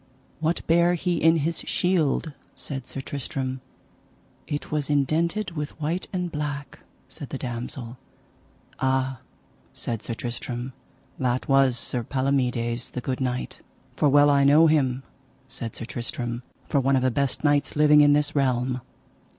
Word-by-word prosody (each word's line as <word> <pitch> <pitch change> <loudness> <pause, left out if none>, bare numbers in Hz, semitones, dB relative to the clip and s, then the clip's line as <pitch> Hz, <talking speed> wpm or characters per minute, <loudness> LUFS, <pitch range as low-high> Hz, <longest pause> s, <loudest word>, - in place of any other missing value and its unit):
What 160 +2 -1
bare 170 +2 +4
he 175 0 0
in 165 +1 +6
his 165 0 -1
shield? 165 -4 +1 0.2
said 135 -3 -5
Sir 135 - -5
Tristram. 130 -1 -4 0.9
It 145 -1 -4
was 150 -2 -1
indented 165 +8 +1
with 150 -2 -5
white 165 +5 -2
and 180 -2 -2
black, 145 -2 -4 0.3
said - - -8
the - - -4
damosel. 120 0 -5 0.8
Ah, 130 -1 0 0.5
said 115 -2 -3
Sir 115 - -4
Tristram, 120 +2 -5 0.5
that 125 -1 0
was 135 -3 +4
Sir 120 0 0
Palomides, 125 -2 0
the 125 - -5
good 130 +1 -3
knight. 125 -1 -3 0.3
For 150 - +3
well 145 +1 +6
I 140 -1 +4
know 145 +4 +7
him, 135 -5 +2 0.4
said 115 -4 -6
Sir 115 - -6
Tristram, 120 0 -4 0.3
for 140 - +2
one 135 +1 +3
of 130 - +2
the 130 - +3
best 140 +3 -1
knights 145 -1 +2
living 150 0 +6
in 145 0 +6
this 145 0 +1
realm. 125 -2 +1
135 Hz, 150 wpm, -25 LUFS, 125-150 Hz, 0.9 s, know